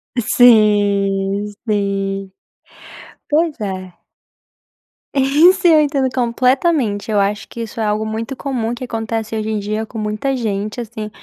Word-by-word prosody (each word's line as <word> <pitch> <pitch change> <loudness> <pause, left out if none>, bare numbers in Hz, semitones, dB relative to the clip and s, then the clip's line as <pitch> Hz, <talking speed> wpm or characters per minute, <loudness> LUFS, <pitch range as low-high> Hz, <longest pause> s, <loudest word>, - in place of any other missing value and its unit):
Sim, 205 -4 +3 0.2
sim. 195 -2 -1 1.0
Pois 310 -1 +1
é. 185 -3 -6 1.1
Isso 295 +8 +4
eu 320 -2 +6
entendo 280 -3 +1
completamente. 250 -2 +1
Eu 210 - +2
acho 205 +2 -1
que 235 - -8
isso 230 0 -7
é 220 - 0
algo 210 +1 0
muito 225 +4 -4
comum 245 -4 -3
que 240 - -8
acontece 225 -2 -3
hoje 215 0 -3
em 215 -1 -1
dia 215 +2 -3
com 225 - -10
muita 215 +5 -2
gente, 215 -1 -3
assim 220 -2 -6
220 Hz, 135 wpm, -18 LUFS, 205-255 Hz, 1.1 s, eu